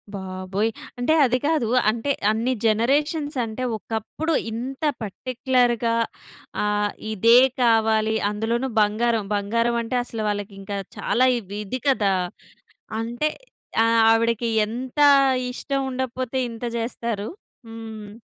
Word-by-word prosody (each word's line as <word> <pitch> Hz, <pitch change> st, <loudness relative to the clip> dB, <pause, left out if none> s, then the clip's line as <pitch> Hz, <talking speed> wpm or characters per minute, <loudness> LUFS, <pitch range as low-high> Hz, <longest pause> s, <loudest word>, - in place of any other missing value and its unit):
బాబోయ్! 190 Hz, +3 st, -2 dB, 0.3 s
అంటే 280 Hz, +6 st, +2 dB
అది 250 Hz, 0 st, +2 dB
కాదు, 300 Hz, -8 st, +1 dB, 0.2 s
అంటే 235 Hz, +5 st, -1 dB, 0.2 s
అన్ని 235 Hz, +4 st, 0 dB
జనరేషన్సంటే, 255 Hz, +1 st, 0 dB
ఒకప్పుడు 225 Hz, +10 st, -3 dB, 0.2 s
ఇంత 260 Hz, +6 st, -5 dB, 0.2 s
పర్టిక్యులర్‌గా 240 Hz, +1 st, 0 dB, 0.7 s
ఆహ్, 210 Hz, 0 st, +1 dB, 0.2 s
ఇదే 230 Hz, +4 st, +6 dB, 0.2 s
కావాలి, 220 Hz, -2 st, +3 dB
అందులోనూ 230 Hz, +5 st, -1 dB
బంగారం, 220 Hz, +2 st, +1 dB
బంగారమంటే 230 Hz, +3 st, 0 dB
అసలు 225 Hz, -2 st, -6 dB
వాళ్ళకింకా 200 Hz, -1 st, -4 dB, 0.2 s
చాలా 255 Hz, +2 st, +2 dB
ఇవ్ 200 Hz, -2 st, -11 dB
ఇది 255 Hz, +6 st, -4 dB
కదా! 210 Hz, -8 st, +3 dB, 0.9 s
అంటే, 240 Hz, +6 st, -1 dB, 0.6 s
ఆహ్, 230 Hz, 0 st, +4 dB
ఆవిడకి 230 Hz, 0 st, +2 dB, 0.2 s
ఎంతా 260 Hz, +5 st, +1 dB, 0.4 s
ఇష్టం 275 Hz, +2 st, -2 dB
ఉండకపోతే, 255 Hz, 0 st, -3 dB
ఇంత 230 Hz, +1 st, -6 dB
జేస్తారు. 230 Hz, -2 st, -3 dB, 0.4 s
హ్మ్. 220 Hz, -2 st, -8 dB
230 Hz, 100 wpm, -23 LUFS, 215-255 Hz, 0.9 s, ఇదే